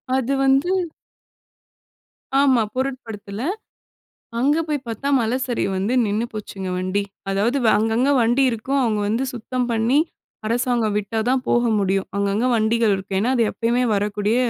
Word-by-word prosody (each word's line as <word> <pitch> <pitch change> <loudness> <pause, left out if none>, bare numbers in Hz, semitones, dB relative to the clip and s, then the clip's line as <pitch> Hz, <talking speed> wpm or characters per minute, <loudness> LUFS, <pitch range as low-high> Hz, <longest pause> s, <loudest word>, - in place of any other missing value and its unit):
அது 265 +1 0
வந்து 270 +6 +3 1.7
ஆமா, 265 -4 +4
பொருட்படுத்துல. 225 -6 -4 1.0
அங்க 285 +5 +3
போய் 290 -3 -2
பாத்தா 230 +5 -4
மலை 230 +2 0
சரிவு 235 -5 -1
வந்து 200 +6 -1
நின்னு 210 +3 0
போச்சுங்க 195 -3 -6
வண்டி. 185 +2 -1 0.3
அதாவது 215 +8 +1 0.2
அங்கங்க 225 +6 +2
வண்டி 240 +4 +3
இருக்கும், 265 +5 -1
அவங்க 215 -3 0
வந்து 230 +5 0
சுத்தம் 245 +1 -3
பண்ணி, 230 +6 +2 0.5
அரசாங்கம் 235 -2 0
விட்டா 210 +2 -2
தான் 260 0 +1
போக 240 - +3 0.2
முடியும். 195 0 0
அங்கங்க 200 +4 0
வண்டிகள் 225 -1 +2
இருக்கு. 190 0 -4
ஏன்னா, 235 +5 +1
அது 230 - +3
எப்பயுமே 240 +2 0
வரக்கூடிய 205 +2 0
230 Hz, 135 wpm, -21 LUFS, 205-255 Hz, 1.7 s, ஆமா